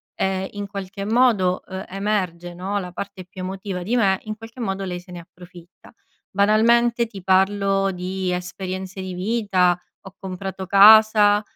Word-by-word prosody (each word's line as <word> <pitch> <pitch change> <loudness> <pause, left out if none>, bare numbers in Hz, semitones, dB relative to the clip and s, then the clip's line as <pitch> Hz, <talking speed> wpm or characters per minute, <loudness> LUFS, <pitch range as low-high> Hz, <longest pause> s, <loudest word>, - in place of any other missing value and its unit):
ehm, 190 0 -1
in 205 0 -5
qualche 195 0 -6
modo, 215 -5 +2
uhm, 190 +1 -6
emerge 185 -3 -2
no, 195 +3 -3
la 180 -2 -7
parte 185 0 -7
più 185 +1 -10
emotiva 190 0 -5
di 230 +6 -1
me, 195 -5 +2
in 215 -1 -5
qualche 225 +3 -12
modo 195 -3 -3
lei 180 -1 -4
se 180 +1 -16
ne 175 - -7
approfitta. 175 +2 -16 0.4
Banalmente 235 +4 +3
ti 200 -4 -11
parlo 195 +1 +2
di 185 0 -3
esperienze 185 +1 -5
di 185 -1 -5
vita. 185 -2 +1 0.2
Ho 190 -1 -13
comprato 190 0 -6
casa, 210 +1 +7
190 Hz, 155 wpm, -22 LUFS, 185-205 Hz, 0.4 s, casa